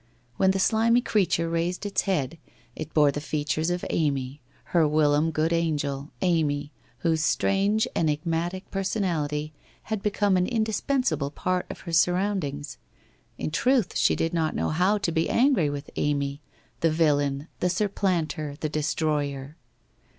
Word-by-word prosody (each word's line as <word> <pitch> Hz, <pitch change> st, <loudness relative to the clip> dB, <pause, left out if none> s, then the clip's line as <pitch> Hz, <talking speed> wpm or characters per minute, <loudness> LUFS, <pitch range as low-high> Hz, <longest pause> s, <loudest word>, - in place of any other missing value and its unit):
When 190 Hz, -, +4 dB
the 190 Hz, -, +2 dB
slimy 230 Hz, +4 st, +3 dB
creature 185 Hz, -7 st, +1 dB
raised 170 Hz, +4 st, -1 dB
its 205 Hz, -, 0 dB
head, 165 Hz, -5 st, -1 dB, 0.4 s
it 155 Hz, 0 st, -6 dB
bore 150 Hz, -2 st, +4 dB
the 145 Hz, -, -4 dB
features 155 Hz, +1 st, -1 dB
of 175 Hz, 0 st, -2 dB
Amy, 140 Hz, -3 st, -1 dB, 0.3 s
her 165 Hz, -3 st, +5 dB
whilom 150 Hz, +1 st, +3 dB
good 160 Hz, +1 st, 0 dB
angel, 145 Hz, -4 st, -1 dB
Amy, 150 Hz, -5 st, +1 dB, 0.3 s
whose 165 Hz, -2 st, +1 dB
strange 200 Hz, +6 st, +2 dB
enigmatic 165 Hz, +4 st, -1 dB
per 195 Hz, -, -1 dB
sonality 155 Hz, -7 st, -1 dB, 0.3 s
had 220 Hz, -2 st, -3 dB
become 205 Hz, -2 st, +2 dB
an 180 Hz, -, +1 dB
indispensable 225 Hz, -, 0 dB
part 180 Hz, +4 st, -2 dB
of -, -, -8 dB
her 170 Hz, -, -7 dB
surround 185 Hz, +3 st, +2 dB
ings. 145 Hz, +1 st, -7 dB, 0.6 s
In -, -, -3 dB
truth 245 Hz, -, +2 dB
she -, -, +3 dB
did 165 Hz, +1 st, -1 dB
not 160 Hz, -2 st, 0 dB
know -, -, 0 dB
how 180 Hz, +6 st, +2 dB
to 195 Hz, -4 st, -1 dB
be 160 Hz, 0 st, 0 dB
angry 240 Hz, -, +3 dB
with 145 Hz, 0 st, -6 dB
Amy, 140 Hz, -1 st, -1 dB, 0.4 s
the 165 Hz, -, +3 dB
villain, 145 Hz, -2 st, +1 dB
the 180 Hz, -, +1 dB
supplanter, 180 Hz, -6 st, -1 dB
the 155 Hz, -, -2 dB
destroyer. 150 Hz, -2 st, -1 dB
165 Hz, 150 wpm, -26 LUFS, 150-190 Hz, 0.6 s, her